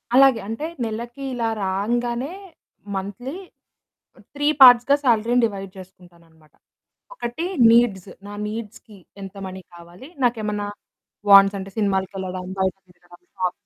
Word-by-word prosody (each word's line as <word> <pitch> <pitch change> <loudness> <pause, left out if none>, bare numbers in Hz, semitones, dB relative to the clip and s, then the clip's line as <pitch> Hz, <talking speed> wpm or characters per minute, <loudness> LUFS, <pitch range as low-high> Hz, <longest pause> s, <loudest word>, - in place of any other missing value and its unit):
అలాగే. 265 -3 +6
అంటే, 225 +8 -4 0.2
నెలకి 235 +4 -6
ఇలా 230 -2 -1 0.2
రాంగానే 240 - -2 0.6
మంథ్లీ 205 - -5 0.8
హ్మ్, - - -20
3 290 0 -2 0.2
పార్ట్స్‌గా 250 +2 +8
శాలరీని 240 0 +2
డివైడ్ 195 -3 -7
జేసుకుంటాననమాట. 170 -4 -17 0.6
ఒకటి 320 - -5 0.3
నీడ్స్. 215 -5 +2 0.2
నా 205 - -8
నీడ్స్‌కి 215 -1 -8 0.2
ఎంత 195 0 -9
మనీ 190 0 -8
కావాలి, 175 - -14 0.2
నాకేమన్నా 210 -3 -1 0.6
వాంట్సంటే, 195 0 +6
సినిమాలకెళ్ళడం, 190 -2 -2
బయట 190 -2 0
తిరగడం, 175 0 -20 0.2
షాప్ 180 -1 -1
205 Hz, 110 wpm, -22 LUFS, 190-240 Hz, 0.8 s, పార్ట్స్‌గా